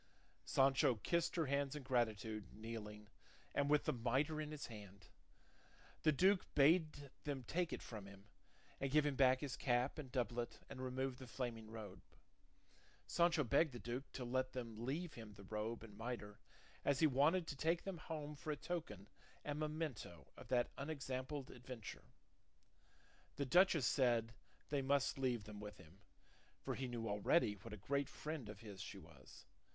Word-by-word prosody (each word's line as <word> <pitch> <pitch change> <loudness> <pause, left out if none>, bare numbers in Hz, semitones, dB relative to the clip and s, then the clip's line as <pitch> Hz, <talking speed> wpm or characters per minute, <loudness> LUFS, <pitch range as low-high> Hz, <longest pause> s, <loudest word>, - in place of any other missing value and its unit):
Sancho 135 -2 +4
kissed 170 - +1
her 165 -3 +2
hands 140 0 +1
in 150 - -5
gratitude, 110 -4 0
kneeling, 105 -1 -6 0.5
and 140 0 +2
with 150 0 +4
the - - +2
mitre 130 +6 +1
in 150 - -4
his 150 -1 -5
hand. 100 -4 -10 0.9
The 155 - +5
duke 185 +6 +4
bade 150 -1 +4
them 140 -3 -2
take 170 +7 0
it - - -4
from 105 -4 -7
him, 100 0 -13 0.5
and 135 - 0
give 150 +2 +5
him 145 -2 +1
back 130 -1 +5
his 145 -3 -2
cap 125 +3 +1
and 135 -4 -6
doublet 120 -2 -1
and 130 - -6
remove 130 0 -2
the 130 - -8
flaming 115 -3 -4
robe. 110 -4 -7 1.0
Sancho 170 -3 +4
begged 140 +3 +3
the 120 - -6
duke 120 +6 -4
to 130 - -4
let 130 +1 0
them 115 -3 -5
leave 160 +4 -2
him 110 -3 -9
the 100 0 -12
robe 110 +3 -3
and 105 -3 -11
mitre; 110 -2 -5 0.4
as 140 -1 +3
he 160 - +6
wanted 155 +6 +4
to 150 - -4
take 165 +4 +1
them 190 -4 -4
home 150 -2 -5
for 150 - -7
a 150 - 0
token 140 - -4 0.4
and 145 0 -2
memento 150 - -3
of - - -11
that 120 -2 +2
unexampled 140 -1 -3
adventure. 125 -3 -8 1.3
The 140 - 0
duchess 175 -1 +5
said 120 -4 +3 0.4
they 145 -1 +1
must 140 0 +2
leave 125 -4 +1
them 105 0 -8
with 105 0 -7
him; 90 +1 -16 0.6
for - - -3
he 130 - -2
knew 120 -2 -3
already 105 +4 +3
what 105 +3 -10
a 105 - -5
great 140 +7 0
friend 150 -8 -5
of 105 0 -8
his 100 -4 -8
she 100 - -6
was. 75 -7 -14
130 Hz, 170 wpm, -41 LUFS, 110-145 Hz, 1.3 s, he